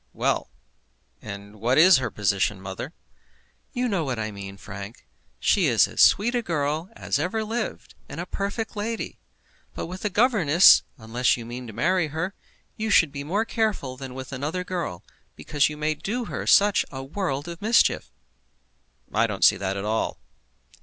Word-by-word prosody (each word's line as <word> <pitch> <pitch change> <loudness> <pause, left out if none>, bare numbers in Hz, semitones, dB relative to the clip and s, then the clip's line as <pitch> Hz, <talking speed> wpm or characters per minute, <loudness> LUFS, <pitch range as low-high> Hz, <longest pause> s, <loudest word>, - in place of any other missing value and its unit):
Well; - - 0 0.7
and 100 0 -9
what 120 +5 +1
is 165 -1 +8
her 130 - -2
position 100 -1 0
mother?" 95 - -6 0.8
"You 250 -1 -1
know 195 -7 0
what 130 -4 -2
I 110 -1 -3
mean, 100 -1 -8
Frank. 100 +3 -9 0.3
She - - +3
is - - +4
as - - -1
sweet 225 +5 +5
a 245 - +1
girl 155 -2 -2
as - - -1
ever 185 +8 -1
lived, 225 +3 -4 0.2
and - - -7
a - - -3
perfect 200 +3 -4
lady. 220 +2 -4 0.6
But - - -4
with 185 +2 -8
a 210 - +1
governess, 195 - +6 0.2
unless 120 +2 +1
you 115 - -7
mean 120 +1 -7
to 110 - -9
marry 170 - +1
her, 160 +6 -3 0.4
you 220 0 -3
should 165 -8 +5
be 140 -1 -5
more 200 +9 0
careful 215 - -1
than 130 -1 -8
with 130 0 -7
another 150 +7 -3
girl, 175 - -4 0.3
because 145 -1 +1
you 150 - -7
may 155 +1 0
do 230 +10 -3
her - - -5
such 205 0 +5
a 135 -1 -6
world 145 -1 -3
of 170 -1 -8
mischief." 225 +3 +3 1.0
"I - - +3
don't - - +1
see - - +6
that 95 0 -2
at 100 - -4
all." 110 +1 -1
150 Hz, 175 wpm, -25 LUFS, 120-200 Hz, 1.0 s, is